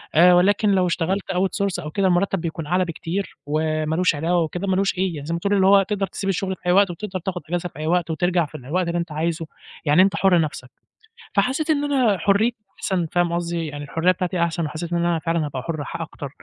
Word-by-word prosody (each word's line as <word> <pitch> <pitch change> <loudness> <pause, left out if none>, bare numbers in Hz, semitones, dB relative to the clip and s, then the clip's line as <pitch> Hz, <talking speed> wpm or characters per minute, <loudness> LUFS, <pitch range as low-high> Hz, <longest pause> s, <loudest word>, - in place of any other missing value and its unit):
آآ، 180 +3 +7
ولكن 200 +4 +4
لو 185 -2 +3
اشتغلت 185 +3 -1
out 185 +1 +1 0.2
source 195 - -2
أو 150 - -6
كده، 195 +4 +1
المرتب 185 +1 +1
بيكون 165 -2 -4
أعلى 180 +3 +2
بكتير، 175 +3 -4
وما 155 +1 -1
لوش 180 -2 +2
علاوة 170 +4 +1
وكده 175 +5 -4
ما 190 - +2
لوش 195 0 0
أيّه، 175 -6 -1
زي 160 +3 -3
ما 170 - -1
تقول، 200 +3 0
اللي 190 -1 +4
هو 195 0 +6
تقدر 195 0 -2
تسيب 195 - -4
الشغل 190 0 -1
في - - -35
أيّ 180 - +3
وقت، 200 +1 +5
وتقدر 185 +2 -5
تاخد 180 0 -4
أجازة 175 0 -2
في 150 - -14
أيّ 155 - -3
وقت، 175 -1 +1
وترجع 175 +1 +1
في 150 +1 -9
أيّ 140 - -9
وقت، 180 0 +1
اللي 170 - -1
أنت 170 -1 -4
عايزُه، 165 +2 -2 0.4
يعني 150 +4 +5
أنت 190 -3 +3
حرّ 180 0 +4
نفسك." 145 -5 -4 0.7
فحسيت 260 +10 +1
إن 295 -2 +2
أنا 235 -7 +3
حريتي 205 +6 +2 0.2
أحسن، 180 -3 0
فاهم 175 -1 +1
قصدي؟ 170 -1 -2
يعني 145 -1 -6
الحرية 165 +5 +2
بتاعتي 180 -1 -2
أحسن، 170 -1 -1
وحسيت 165 +3 -5
إن - - +2
أنا 170 -1 +1
فعلًا 165 0 -1
هابقى 135 -3 -4
حرّ 155 -3 -3 0.2
أكتر. 145 -3 -8
175 Hz, 235 wpm, -22 LUFS, 160-190 Hz, 0.7 s, آآ